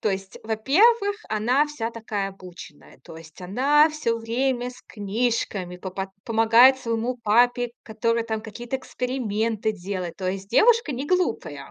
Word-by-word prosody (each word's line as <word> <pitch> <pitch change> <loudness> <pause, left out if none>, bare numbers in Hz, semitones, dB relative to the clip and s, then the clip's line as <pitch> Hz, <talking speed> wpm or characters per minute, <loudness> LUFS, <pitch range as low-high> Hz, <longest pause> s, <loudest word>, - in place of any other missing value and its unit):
то - - 0
есть, 195 0 -5
во-первых, 400 - +3
она 245 +7 +2
вся 240 -6 -4
такая 215 -4 -4
обученная. 180 -8 -13
То 160 - -11
есть 160 -1 -15
она 280 - +3
всё 270 -7 -1
время 245 +2 -1
с 250 - -15
книжками 205 -4 -2
по 185 +1 -7
пот 190 +1 -4 0.2
помогает 230 +4 +5
своему 235 +1 -2
папе, 245 +2 +3
который 230 +1 -1
там 220 -1 -3
какие-то 235 +4 -5
эксперименты 230 -4 -2
делает. 185 -3 -5
То 185 -1 -2
есть 195 +1 -6
девушка 460 - +4
не 265 +4 -4
глупая. 365 +1 -1
230 Hz, 150 wpm, -24 LUFS, 200-255 Hz, 0.2 s, помогает